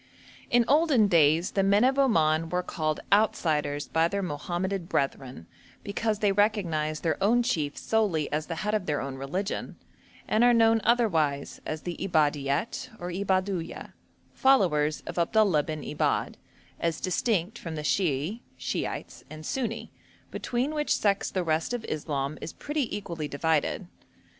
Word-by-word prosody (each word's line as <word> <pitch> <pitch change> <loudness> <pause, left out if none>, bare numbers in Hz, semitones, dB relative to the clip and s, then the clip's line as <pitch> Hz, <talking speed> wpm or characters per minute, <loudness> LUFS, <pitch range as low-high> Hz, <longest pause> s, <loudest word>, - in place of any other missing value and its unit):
In 240 -1 +4
olden 290 -7 +4
days 165 -1 +4
the 195 - +1
men 200 +3 +4
of 265 +2 +3
Oman 165 - +3
were 180 +1 -1
called 155 -3 -2
'outsiders' 155 -8 +1
by 160 +1 +2
their 200 +2 -2
Mohammedan 175 +4 -3
brethren, 135 - -2 0.4
because 215 +1 -1
they 205 -1 +2
recognised 175 -7 0
their 165 +3 0
own 240 +4 +4
chief 150 -10 -1
solely 200 -9 +1
as 155 +1 -1
the 165 - -3
head 210 - 0
of 210 -4 -1
their 150 -2 0
own 135 0 -4
religion, 180 +10 -3 0.5
and 220 - +3
are 245 0 +6
known 225 -1 +4
otherwise 165 -13 +1
as 155 0 -4
the 175 -1 -4
Ibadiet 150 - 0
or 175 +1 -5
Ibadhuyah, 185 -1 -2 0.4
followers 165 - +3
of - - -4
Abdullah 185 -2 +3
bin 155 -1 -5
Ibadh, 150 - -1 0.4
as 165 -2 -1
distinct 200 +2 -1
from 165 -2 -6
the 150 - -4
Shiahi 165 - 0 0.2
(Shiites) - - -4
and 155 0 -9
Sunni, 230 0 -3 0.4
between 255 +5 -2
which 300 -1 +1
sects 200 -2 +1
the 185 - -1
rest 160 +7 0
of 235 - -6
Islam 145 -1 -3
is 160 - -6
pretty 290 -8 -2
equally 170 -6 -5
divided. 150 +2 0
175 Hz, 150 wpm, -27 LUFS, 155-215 Hz, 0.5 s, are